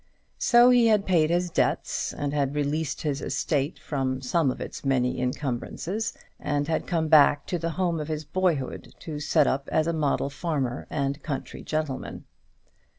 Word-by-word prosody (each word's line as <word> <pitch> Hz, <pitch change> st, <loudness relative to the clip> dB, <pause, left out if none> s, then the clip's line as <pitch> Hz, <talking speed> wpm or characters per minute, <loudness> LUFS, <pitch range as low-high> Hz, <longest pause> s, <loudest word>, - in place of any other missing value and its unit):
So 240 Hz, +1 st, +6 dB
he 245 Hz, -2 st, +5 dB
had 210 Hz, -2 st, +3 dB
paid 165 Hz, -4 st, +3 dB
his 175 Hz, +1 st, 0 dB
debts, -, -, 0 dB
and 145 Hz, 0 st, -3 dB
had 140 Hz, -1 st, 0 dB
released 150 Hz, +1 st, -1 dB
his 145 Hz, -2 st, -1 dB
estate 140 Hz, +2 st, -1 dB
from 130 Hz, -3 st, -2 dB
some 135 Hz, +3 st, +1 dB
of -, -, -3 dB
its -, -, -7 dB
many 130 Hz, -2 st, +1 dB
incumbrances, 140 Hz, -, -3 dB, 0.2 s
and 145 Hz, 0 st, -1 dB
had 160 Hz, -, -1 dB
come 165 Hz, -3 st, 0 dB
back 150 Hz, -2 st, +5 dB
to 175 Hz, -, -2 dB
the 165 Hz, +1 st, -2 dB
home 175 Hz, -3 st, 0 dB
of 150 Hz, -, -4 dB
his 155 Hz, -1 st, -3 dB
boyhood, 165 Hz, -4 st, -1 dB
to 155 Hz, -3 st, -5 dB
set 145 Hz, -, +3 dB
up 140 Hz, +1 st, -1 dB
as 155 Hz, -, +2 dB
a 170 Hz, -, 0 dB
model 145 Hz, -3 st, 0 dB
farmer 140 Hz, -5 st, -2 dB
and 140 Hz, 0 st, -2 dB
country 140 Hz, -3 st, -5 dB
gentleman. 155 Hz, -4 st, -4 dB
150 Hz, 170 wpm, -26 LUFS, 140-165 Hz, 0.2 s, So